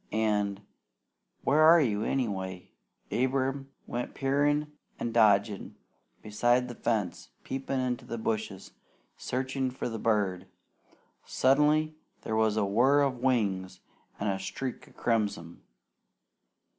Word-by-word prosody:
An' 105 -2 0 0.8
where 145 +3 +3
are 160 +2 +8
you, 110 -8 +1
anyway?" 95 -8 -3 0.4
Abram 135 +2 0 0.2
went 120 +1 -4
peering 145 +2 +1 0.3
and 115 - -3
dodging 105 -2 +3 0.5
beside 120 +4 +2
the 120 - -6
fence, 110 -6 -2
peeping 135 0 -3
into 125 -1 -2
the 115 - -5
bushes, 110 -4 -3 0.4
searching 130 +1 -2
for 125 - -4
the 115 -2 -4
bird. 95 -5 0 0.8
Suddenly 150 +4 +3 0.3
there 110 - -2
was 110 -1 +2
a 105 - +2
whir 125 +8 +4
of 130 -3 -1
wings 100 -8 0 0.4
and 100 - -2
a 95 -1 0
streak 125 +6 -5
of - - -21
crimson. 105 -7 -1
115 Hz, 120 wpm, -29 LUFS, 105-135 Hz, 0.8 s, are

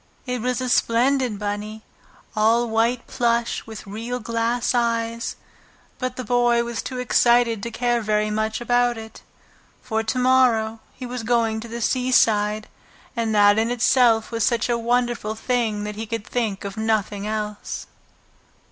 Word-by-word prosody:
It 250 -2 -3
was 250 +1 -1
a 255 - -2
splendid 245 0 +2
bunny, 210 +1 -4 0.5
all 225 +3 +3
white 230 +2 +1
plush 235 -1 -1
with 220 -1 -9
real 230 +5 -5
glass 230 +2 -1
eyes, 230 -1 -1 0.6
but 255 -1 -3
the 255 - -5
Boy 240 0 +2
was 235 -1 -4
too 255 - -6
excited 240 -2 +3
to 235 - -4
care 240 0 0
very 215 0 0
much 215 +1 -1
about 245 0 +2
it. 220 0 -10 0.6
For 220 -3 -1
to 225 +3 -2
morrow 250 -3 +3 0.2
he 255 - -7
was 250 0 -5
going 225 -1 +1
to 230 - -8
the 235 +1 -6
seaside, 215 -4 +2 0.5
and 225 -2 -1
that 205 0 +5
in 225 +1 +1
itself 245 -2 +3
was 230 -1 -1
such 235 +1 +1
a 240 - +2
wonderful 235 -2 0
thing 225 -3 -1
that 210 0 -4
he 220 +1 -5
could 225 -1 -4
think 220 -6 -2
of 200 +1 -6
nothing 210 -2 -1
else. 210 -1 -4
230 Hz, 155 wpm, -23 LUFS, 220-245 Hz, 0.6 s, that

